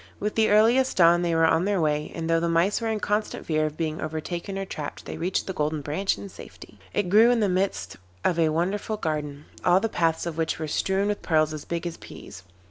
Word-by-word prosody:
With 210 Hz, +1 st, -2 dB
the 220 Hz, -1 st, +2 dB
earliest 235 Hz, +5 st, +4 dB
dawn 170 Hz, -1 st, +6 dB
they 170 Hz, -1 st, 0 dB
were 165 Hz, 0 st, +4 dB
on 160 Hz, +2 st, +3 dB
their 200 Hz, -2 st, +1 dB
way, 150 Hz, -2 st, 0 dB
and 165 Hz, -1 st, -3 dB
though 165 Hz, 0 st, +3 dB
the 170 Hz, 0 st, -1 dB
Mice 170 Hz, +7 st, +2 dB
were 230 Hz, -, -1 dB
in 220 Hz, -1 st, -1 dB
constant 210 Hz, +1 st, -2 dB
fear 155 Hz, -1 st, +1 dB
of 155 Hz, -, -8 dB
being 160 Hz, -1 st, -3 dB
overtaken 170 Hz, +5 st, -4 dB
or 195 Hz, -, -3 dB
trapped, 150 Hz, -5 st, -7 dB
they -, -, -6 dB
reached 180 Hz, +2 st, -1 dB
the 190 Hz, -, -4 dB
Golden 150 Hz, -1 st, -1 dB
Branch 155 Hz, +8 st, -1 dB
in -, -, -8 dB
safety. -, -, -13 dB
It 205 Hz, -3 st, -1 dB
grew 220 Hz, +4 st, +7 dB
in 245 Hz, -1 st, +3 dB
the 210 Hz, -, +2 dB
midst 180 Hz, -, -1 dB, 0.3 s
of 170 Hz, -2 st, +2 dB
a 160 Hz, -1 st, +3 dB
wonderful 190 Hz, +7 st, -1 dB
garden, 150 Hz, -4 st, -4 dB, 0.2 s
all 180 Hz, +1 st, +5 dB
the 225 Hz, -, -1 dB
paths 165 Hz, -4 st, 0 dB
of 165 Hz, -1 st, -4 dB
which 160 Hz, -, 0 dB
were 155 Hz, -, -4 dB
strewn 190 Hz, +6 st, 0 dB
with 205 Hz, 0 st, -2 dB
pearls 155 Hz, -2 st, +1 dB
as 155 Hz, -, -7 dB
big 170 Hz, 0 st, -4 dB
as 170 Hz, -1 st, -4 dB
peas. 95 Hz, -, -11 dB
170 Hz, 240 wpm, -25 LUFS, 155-200 Hz, 0.3 s, grew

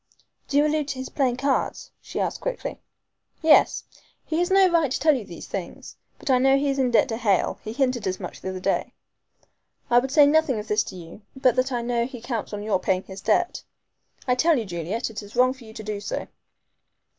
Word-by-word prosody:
"Do 280 Hz, -, 0 dB
you 295 Hz, -, +5 dB
allude 300 Hz, -1 st, 0 dB
to 280 Hz, -, -4 dB
his 260 Hz, 0 st, -5 dB
playing 255 Hz, -4 st, 0 dB
cards?" 275 Hz, +1 st, -1 dB
she -, -, -6 dB
asked -, -, -2 dB
quickly. -, -, -4 dB, 0.6 s
"Yes. 315 Hz, -1 st, +5 dB, 0.4 s
He 320 Hz, +1 st, -1 dB
has 350 Hz, -, +1 dB
no 385 Hz, 0 st, +6 dB
right 335 Hz, -5 st, +2 dB
to 260 Hz, -, -2 dB
tell 305 Hz, +2 st, +4 dB
you 245 Hz, -, -3 dB
these 170 Hz, -3 st, -9 dB
things. 185 Hz, -3 st, -7 dB, 0.2 s
But 275 Hz, -, -2 dB
I 255 Hz, -, +4 dB
know 270 Hz, +1 st, +4 dB
he 280 Hz, +1 st, 0 dB
is 275 Hz, -, -2 dB
in 255 Hz, -2 st, +2 dB
debt 240 Hz, +2 st, +4 dB
to 225 Hz, -, -2 dB
Hale 205 Hz, -5 st, +1 dB
he 215 Hz, -, -5 dB
hinted 250 Hz, -4 st, 0 dB
as 185 Hz, 0 st, -2 dB
much -, -, -8 dB
the 190 Hz, -, -4 dB
other 185 Hz, 0 st, -5 dB
day. 185 Hz, -, -1 dB, 1.0 s
I 240 Hz, -, +7 dB
would 265 Hz, +2 st, -3 dB
say 290 Hz, +2 st, +6 dB
nothing 295 Hz, -4 st, +3 dB
of 210 Hz, 0 st, -5 dB
this 210 Hz, 0 st, +2 dB
to -, -, -8 dB
you, 170 Hz, +3 st, -11 dB
but 260 Hz, -2 st, +3 dB
that 255 Hz, +1 st, +1 dB
I 240 Hz, -2 st, -1 dB
know 235 Hz, 0 st, 0 dB
he 255 Hz, -2 st, -9 dB
counts 235 Hz, -2 st, -4 dB
on 205 Hz, -1 st, -5 dB
your 210 Hz, -3 st, +1 dB
paying 185 Hz, 0 st, 0 dB
his 190 Hz, 0 st, -10 dB
debts. 350 Hz, +11 st, +1 dB, 0.6 s
I 250 Hz, -, +4 dB
tell 315 Hz, +5 st, +3 dB
you, 230 Hz, -, -2 dB
Juliet, 185 Hz, +6 st, -3 dB
it 220 Hz, -, -6 dB
is 205 Hz, +2 st, -12 dB
wrong 255 Hz, +1 st, +4 dB
for 255 Hz, -3 st, -15 dB
you 220 Hz, -, -12 dB
to 220 Hz, -, -8 dB
do 210 Hz, -1 st, -4 dB
so." -, -, -4 dB
250 Hz, 235 wpm, -24 LUFS, 210-275 Hz, 1.0 s, I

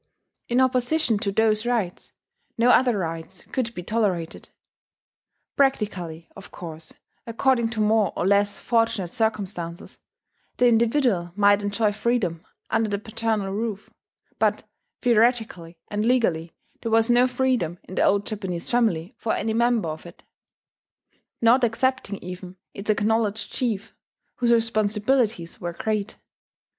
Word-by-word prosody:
In 240 Hz, +1 st, +1 dB
opposition 255 Hz, -1 st, +2 dB
to 200 Hz, -, -1 dB
those 215 Hz, +1 st, +2 dB
rights, 220 Hz, -8 st, -2 dB, 0.5 s
no 240 Hz, +2 st, +5 dB
other 245 Hz, -4 st, +4 dB
rights 165 Hz, 0 st, -5 dB
could 250 Hz, -4 st, -1 dB
be 180 Hz, -, -5 dB
tolerated. 185 Hz, -6 st, -2 dB, 1.1 s
Practically, 190 Hz, -, 0 dB
of 195 Hz, -, -11 dB
course, 160 Hz, -2 st, -9 dB, 0.4 s
according 235 Hz, 0 st, +1 dB
to 220 Hz, -2 st, -2 dB
more 215 Hz, -1 st, +3 dB
or -, -, 0 dB
less 200 Hz, +1 st, +2 dB
fortunate 225 Hz, -6 st, 0 dB
circumstances, 200 Hz, -7 st, -3 dB, 0.6 s
the 250 Hz, -, +5 dB
individual 230 Hz, -6 st, +2 dB
might 205 Hz, 0 st, +4 dB
enjoy 205 Hz, +1 st, +1 dB
freedom 205 Hz, -7 st, -1 dB, 0.3 s
under 220 Hz, -1 st, +1 dB
the 200 Hz, -, -1 dB
paternal 215 Hz, -2 st, -2 dB
roof; 215 Hz, -1 st, -4 dB, 0.5 s
but -, -, +1 dB, 0.4 s
theoretically 225 Hz, -8 st, +1 dB
and 210 Hz, 0 st, -1 dB
legally 185 Hz, -10 st, +1 dB, 0.3 s
there 230 Hz, -, -3 dB
was 225 Hz, 0 st, +4 dB
no 245 Hz, +1 st, +5 dB
freedom 250 Hz, -9 st, 0 dB
in -, -, -11 dB
the -, -, +1 dB
old 200 Hz, +1 st, +3 dB
Japanese 190 Hz, -6 st, -4 dB
family 215 Hz, -7 st, +1 dB
for 225 Hz, -, -1 dB
any 220 Hz, -, -1 dB
member 235 Hz, -5 st, +2 dB
of 155 Hz, +2 st, -7 dB
it, 170 Hz, -, -15 dB, 1.2 s
not 245 Hz, +3 st, +5 dB
excepting 240 Hz, -2 st, 0 dB
even 180 Hz, +1 st, -8 dB, 0.2 s
its 200 Hz, +2 st, -8 dB
acknowledged 215 Hz, 0 st, 0 dB
chief, 225 Hz, -4 st, -2 dB, 0.4 s
whose 240 Hz, -1 st, +2 dB
responsibilities 220 Hz, -3 st, +1 dB
were 175 Hz, -1 st, -3 dB
great. 215 Hz, +2 st, -2 dB
215 Hz, 130 wpm, -24 LUFS, 190-235 Hz, 1.2 s, no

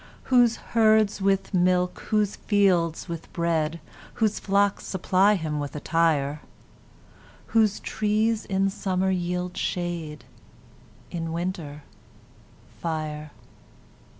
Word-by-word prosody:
Whose 240 Hz, -2 st, +5 dB, 0.2 s
herds 215 Hz, -3 st, +4 dB
with 195 Hz, +1 st, +1 dB
milk, 180 Hz, 0 st, +2 dB
whose 210 Hz, -2 st, +1 dB
fields 185 Hz, -6 st, +1 dB
with 170 Hz, -2 st, -7 dB
bread, 165 Hz, -2 st, 0 dB, 0.4 s
Whose 220 Hz, -3 st, +1 dB
flocks 200 Hz, 0 st, +1 dB
supply 190 Hz, +2 st, +2 dB
him 155 Hz, -5 st, -3 dB
with 145 Hz, -1 st, -5 dB
attire; 150 Hz, -2 st, +1 dB, 1.1 s
Whose 215 Hz, -3 st, +3 dB
trees 215 Hz, +1 st, 0 dB
in 195 Hz, 0 st, +1 dB
summer 190 Hz, -1 st, -1 dB
yield 180 Hz, 0 st, -2 dB
shade, 170 Hz, -4 st, -3 dB, 0.9 s
In 165 Hz, -1 st, -4 dB
winter, 165 Hz, -4 st, -4 dB, 1.0 s
fire. 155 Hz, -2 st, -4 dB
180 Hz, 95 wpm, -25 LUFS, 165-205 Hz, 1.1 s, Whose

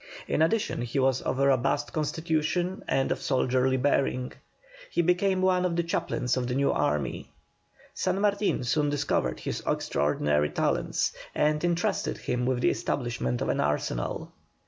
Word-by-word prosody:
In -, -, 0 dB
addition 205 Hz, -, +1 dB
he 120 Hz, +3 st, -3 dB
was 130 Hz, -1 st, +2 dB
of -, -, -2 dB
a 140 Hz, -, +3 dB
robust 140 Hz, +2 st, +1 dB
constitution 160 Hz, +4 st, -1 dB
and 135 Hz, -, +1 dB
of -, -, -1 dB
soldierly 130 Hz, 0 st, +1 dB
bearing. 130 Hz, -1 st, 0 dB, 0.6 s
He 170 Hz, -, +1 dB
became 185 Hz, +2 st, +2 dB
one 185 Hz, -1 st, +3 dB
of 180 Hz, -2 st, 0 dB
the 170 Hz, -, +1 dB
chaplains 125 Hz, -6 st, -1 dB
of 125 Hz, -1 st, -1 dB
the 125 Hz, -, -2 dB
new 140 Hz, +1 st, +2 dB
army. 75 Hz, -2 st, -1 dB, 0.6 s
San 185 Hz, +1 st, -1 dB
Martin 200 Hz, -7 st, +1 dB
soon 145 Hz, +4 st, +1 dB
discovered 145 Hz, 0 st, -1 dB
his -, -, -3 dB
extraordinary 75 Hz, +1 st, +1 dB
talents, -, -, 0 dB, 0.2 s
and 150 Hz, +1 st, +1 dB
entrusted 175 Hz, 0 st, 0 dB
him 125 Hz, 0 st, -2 dB
with 130 Hz, -1 st, 0 dB
the -, -, +4 dB
establishment 115 Hz, -, -2 dB
of -, -, -2 dB
an -, -, 0 dB
arsenal. 70 Hz, -4 st, -2 dB
140 Hz, 155 wpm, -27 LUFS, 125-170 Hz, 0.6 s, the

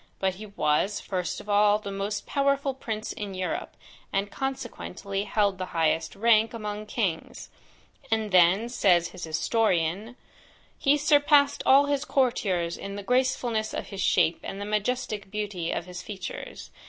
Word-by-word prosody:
But 190 Hz, -1 st, 0 dB
he 215 Hz, -, -7 dB
was, 195 Hz, +1 st, 0 dB
first 180 Hz, -3 st, -3 dB
of -, -, -12 dB
all, 205 Hz, 0 st, +4 dB
the 205 Hz, -2 st, -7 dB
most 200 Hz, +1 st, -3 dB
powerful 280 Hz, -1 st, +1 dB
prince 220 Hz, -4 st, -5 dB
in 205 Hz, -3 st, -6 dB
Europe, 185 Hz, 0 st, -4 dB, 0.3 s
and 200 Hz, +1 st, -1 dB
consequently 210 Hz, -7 st, -4 dB
held 200 Hz, -3 st, +1 dB
the 185 Hz, -, -3 dB
highest 160 Hz, 0 st, +1 dB
rank 225 Hz, +2 st, +3 dB
among 210 Hz, -1 st, -5 dB
kings; 195 Hz, -8 st, -3 dB, 0.6 s
and 220 Hz, -2 st, 0 dB
then, 185 Hz, +5 st, +5 dB
says 180 Hz, -8 st, +3 dB
his 175 Hz, -, -7 dB
historian, 185 Hz, +4 st, 0 dB, 0.6 s
'he 285 Hz, +1 st, +4 dB
surpassed 290 Hz, -1 st, +4 dB
all 275 Hz, +2 st, +7 dB
his 285 Hz, 0 st, 0 dB
courtiers 195 Hz, -, 0 dB
in 200 Hz, 0 st, -6 dB
the 205 Hz, -, -6 dB
gracefulness 245 Hz, -2 st, 0 dB
of -, -, -5 dB
his 195 Hz, -2 st, -5 dB
shape, 170 Hz, -, +3 dB
and 195 Hz, -, -6 dB
the 200 Hz, -, -4 dB
majestic 210 Hz, -1 st, -2 dB
beauty 205 Hz, -5 st, -3 dB
of 170 Hz, -, -3 dB
his 180 Hz, 0 st, -7 dB
features. 190 Hz, -2 st, -7 dB
210 Hz, 155 wpm, -27 LUFS, 190-235 Hz, 0.6 s, all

